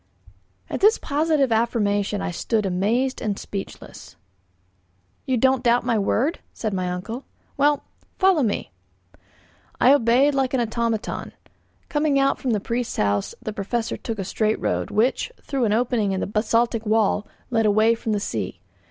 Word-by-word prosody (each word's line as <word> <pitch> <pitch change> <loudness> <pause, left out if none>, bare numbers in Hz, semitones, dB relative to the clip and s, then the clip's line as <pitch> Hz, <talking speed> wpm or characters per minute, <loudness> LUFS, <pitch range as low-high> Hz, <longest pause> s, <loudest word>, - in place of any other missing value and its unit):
At - - -4
this 425 +3 +5
positive 295 -3 +1
affirmation 210 -3 +1
I - - -2
stood 215 +4 -1
amazed 220 +8 0
and 210 -4 -1
speechless. 195 -1 -8 1.1
"You 260 -1 +1
don't 260 +1 +3
doubt 240 0 +3
my 235 -3 +2
word?" 250 - 0
said 215 -3 -3
my 185 -1 -1
uncle. 220 +9 -5 0.3
"Well, 290 0 +2 0.3
follow 375 -5 +4
me." 210 - -1 1.1
I 260 - +6
obeyed 265 +2 +4
like 265 -1 0
an - - +1
automaton. 230 -1 -2 0.5
Coming 295 -1 +1
out 275 0 +2
from 260 - -2
the 215 -3 +2
priest's 235 +4 -3
house, 100 -1 0
the 215 -3 -4
Professor 220 +3 -2
took 225 -2 -5
a 195 - -2
straight 215 +3 0
road, - - -1
which, 220 - +1
through 270 -4 -1
an 210 - +1
opening 225 -3 +1
in 190 - -1
the - - -1
basaltic 230 +2 +1
wall, 215 -1 +1 0.2
led 225 -2 +2
away 215 +2 +4
from 225 -1 -3
the 210 - +1
sea. 100 - -4
230 Hz, 160 wpm, -23 LUFS, 210-260 Hz, 1.1 s, I